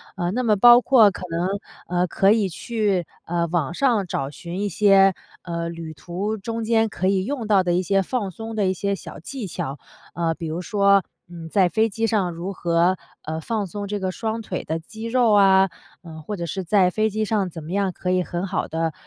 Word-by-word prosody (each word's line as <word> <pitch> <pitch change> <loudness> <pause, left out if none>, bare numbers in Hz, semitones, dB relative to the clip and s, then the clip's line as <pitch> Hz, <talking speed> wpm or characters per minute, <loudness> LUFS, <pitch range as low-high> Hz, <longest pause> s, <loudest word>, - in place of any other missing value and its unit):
呃， 175 -1 -1
那 250 +4 -1
么 215 -3 +3
包 240 +4 +8
括 225 -5 +6
可 185 - -9
能， 170 +2 -1 0.5
呃， 180 - +2
可 195 +3 +3
以 215 -3 +3
去， 200 -2 -1 0.2
呃， 170 0 -1
网 165 -2 -1
上 230 -5 +2
找 135 -5 -2
寻 170 +5 -7
一 205 - -1
些， 195 0 +5 0.3
呃， 170 -1 -3
旅 165 -1 -7
途 195 +7 -4
中 230 +3 -4
间 225 0 +2
可 185 -2 -2
以 190 -1 +1
用 250 -4 -3
到 200 -3 +4
的 175 -1 0
一 180 - +2
些 195 +1 +2
放 200 -1 -2
松 225 +4 -7
的 205 -2 +1
一 185 - +1
些 200 +2 -1
小 165 - -10
技 240 - -6
巧。 140 -4 -5 0.4
呃， 165 -1 0
比 165 -1 -6
如 165 +3 -3
说， 200 -1 +3 0.3
嗯， 165 -2 -9
在 190 -2 +3
飞 220 +4 +2
机 225 +2 -1
上 200 -5 +1
如 175 +4 -5
何， 175 +1 +1 0.3
呃， 160 +1 -4
放 215 -2 -2
松 205 +2 -6
这 205 0 -3
个 185 -1 -2
双 225 +3 -3
腿 185 -4 -5
的 160 +1 -3
肌 220 +7 -11
肉 235 -1 +3
啊， 195 -1 +5 0.3
嗯， 160 -2 -10
或 210 - -4
者 170 - -4
是 190 +5 -4
在 185 +1 +3
飞 215 +4 0
机 215 +1 -2
上 205 -4 0
怎 165 -1 -8
么 155 - -8
样 195 -1 0
可 180 - -5
以 185 0 +2
很 175 +3 -4
好 190 - -2
的， 160 -1 -2
195 Hz, 240 characters per minute, -23 LUFS, 175-215 Hz, 0.5 s, 包